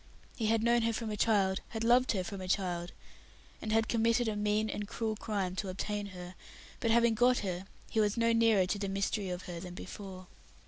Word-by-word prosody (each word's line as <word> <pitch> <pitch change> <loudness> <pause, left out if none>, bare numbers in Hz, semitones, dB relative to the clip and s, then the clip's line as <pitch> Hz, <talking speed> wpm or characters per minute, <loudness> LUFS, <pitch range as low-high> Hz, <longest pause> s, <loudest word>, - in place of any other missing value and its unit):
He 225 - -1
had 225 0 +2
known 235 0 +4
her 230 0 +1
from 220 -1 -3
a - - -2
child, 195 -3 +2
had 225 -1 -4
loved 245 +2 +4
her 190 -3 -1
from 190 +2 -6
a 185 - -5
child, 180 -2 -1 0.7
and 215 - -3
had 225 0 +3
committed 230 +1 +2
a 215 - -1
mean 210 +1 +1
and 210 -1 -4
cruel 220 0 -2
crime 200 -4 -2
to 195 - -2
obtain 205 +2 -3
her; 180 -2 -9 0.5
but 230 - 0
having 235 0 +4
got 245 +3 +4
her, 185 0 -3 0.2
he 220 - -1
was 210 +1 +2
no 230 0 +3
nearer 225 -4 +4
to 200 +3 -2
the 200 -1 -2
mystery 195 0 -1
of 180 0 -4
her 175 -1 -6
than 180 +1 -8
before. 185 0 -8
210 Hz, 220 wpm, -32 LUFS, 190-225 Hz, 0.7 s, known